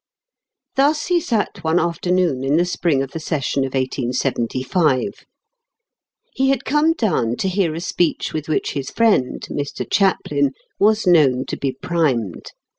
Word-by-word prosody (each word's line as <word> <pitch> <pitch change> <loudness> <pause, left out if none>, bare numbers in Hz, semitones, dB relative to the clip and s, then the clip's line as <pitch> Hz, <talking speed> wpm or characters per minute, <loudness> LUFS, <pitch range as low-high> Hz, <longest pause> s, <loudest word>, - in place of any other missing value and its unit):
Thus 295 +3 +3
he 350 -1 +2
sat 210 - -2
one 160 +1 +2
afternoon 170 -4 0
in 140 +3 +2
the 175 - +3
spring 170 -6 0
of 135 - -7
the 165 - -5
session 145 -3 -1
of 135 - -5
1875. 130 - -1 1.1
He 270 0 +1
had 270 -1 0
come 300 +2 +3
down 125 - 0
to 190 - -2
hear 185 -4 0
a - - -4
speech 175 -1 -1
with 155 -1 -4
which 155 - 0
his 140 -2 -4
friend, 215 - +1
Mr. 145 -1 -4
Chaplin, 145 -8 +1 0.3
was 215 +2 +3
known 140 -8 +4
to - - -2
be 135 - -2
primed. 130 - -1
160 Hz, 150 wpm, -20 LUFS, 135-195 Hz, 1.1 s, known